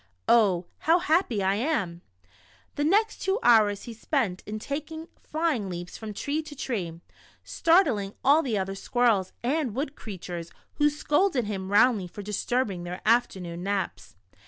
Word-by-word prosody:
Oh, 195 -7 +4
how 330 +2 +4
happy 315 - +1
I 190 +1 +2
am." 205 - -1 0.7
The 290 - -2
next 420 +8 +2
two 385 +1 +1
hours 210 -4 +4
he 235 - -7
spent 225 -5 -1
in 215 +1 -4
taking 310 +7 -5
flying 300 - -1
leaps 175 0 -6
from 220 -1 -6
tree 285 +9 -2
to 305 -1 -11
tree, 185 - -4 0.4
startling 275 - +2
all 290 +4 +5
the 240 -8 -1
other 195 0 -2
squirrels 210 -2 +1
and 260 -3 0
wood 280 +2 -3
creatures, 175 -5 -7 0.3
who 295 -1 +4
scolded 295 - +1
him 195 -2 -4
roundly 205 -2 +4
for 205 +4 -9
disturbing 210 -2 -1
their 180 +1 -5
afternoon 190 -7 +1
naps. 195 +1 -3
225 Hz, 150 wpm, -27 LUFS, 195-295 Hz, 0.7 s, all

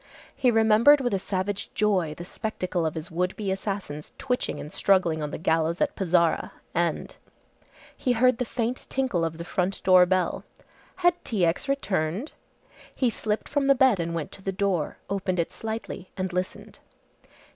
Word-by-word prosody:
He 255 - +3
remembered 225 +5 +6
with 245 -5 -1
a 195 - +1
savage 195 +1 -3
joy 185 -7 +1
the 175 - -7
spectacle 185 -4 -2
of 155 - -4
his 160 +1 -6
would 180 +2 -1
be 200 -3 -2
assassins 190 -6 -4
twitching 250 -2 -2
and 150 - -8
struggling 175 -5 +2
on 150 - -2
the - - -5
gallows 165 +1 +1
at 295 - +1
Pezara 175 -3 +1 0.2
and - - -1 0.8
he 250 - 0
heard 250 +1 +3
the - - +2
faint 240 +1 -3
tinkle 255 -11 0
of 165 -1 -2
the 170 - -6
front 185 +2 -1
door 185 -1 +7
bell. 185 -1 0 0.6
Had 350 0 +3
T. 200 -6 +1
X. 170 - -1
returned! 200 - -1 0.6
He 250 -3 +2
slipped 215 0 -2
from 285 -2 0
the 275 - +6
bed 255 -6 +4
and 170 0 -2
went 160 -3 -4
to - - -11
the 195 - -2
door, 190 -5 -1
opened 190 -2 -1
it 170 - -1
slightly 220 -4 -5
and 185 -1 -2
listened. 180 +1 -4
190 Hz, 175 wpm, -26 LUFS, 170-225 Hz, 0.8 s, door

